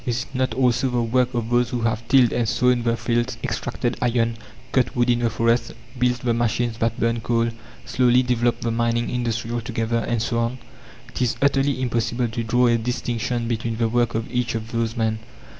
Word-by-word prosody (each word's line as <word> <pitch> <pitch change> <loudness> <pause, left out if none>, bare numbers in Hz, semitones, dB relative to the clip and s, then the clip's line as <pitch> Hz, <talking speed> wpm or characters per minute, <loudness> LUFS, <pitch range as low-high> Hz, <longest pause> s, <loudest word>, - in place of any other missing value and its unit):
Is 120 0 -1
it 140 - -17
not 130 -3 0
also 130 0 +2
the 120 -1 0
work 125 +2 +1
of 115 0 -2
those 120 0 +3
that 120 -1 -2
have 115 0 -1
tilled 130 -2 +5
and 120 -2 0
sown 125 +1 +2
the 115 0 0
fields, 120 +1 -1
extracted 120 0 -2
iron, 115 -1 +1 0.4
cut 130 +1 +1
wood 120 0 +3
in 120 - +1
the 120 -1 +1
forests, 115 +2 +1 0.3
built 125 0 +1
the 120 -2 +1
machines 120 0 0
that 115 0 0
burn 115 0 +1
coal, 115 0 +1 0.3
slowly 125 0 +3
developed 120 -1 0
the 115 - 0
mining 115 +1 0
industry 120 -2 -2
altogether, 115 -1 -1
and 115 0 -1
so 115 +1 -1
on? 115 +2 -1 0.5
It - - -6
is 125 -2 +1
utterly 140 -1 +2
impossible 120 -1 -1
to 115 +1 -3
draw 120 +2 +2
a 115 -1 +3
distinction 120 0 -2
between 115 -1 -2
the 115 -1 +1
work 120 -1 +1
of 110 0 -1
each 125 -2 -1
of 110 0 -5
those 115 -1 -1
men. 110 -1 0
120 Hz, 205 wpm, -23 LUFS, 115-125 Hz, 0.5 s, tilled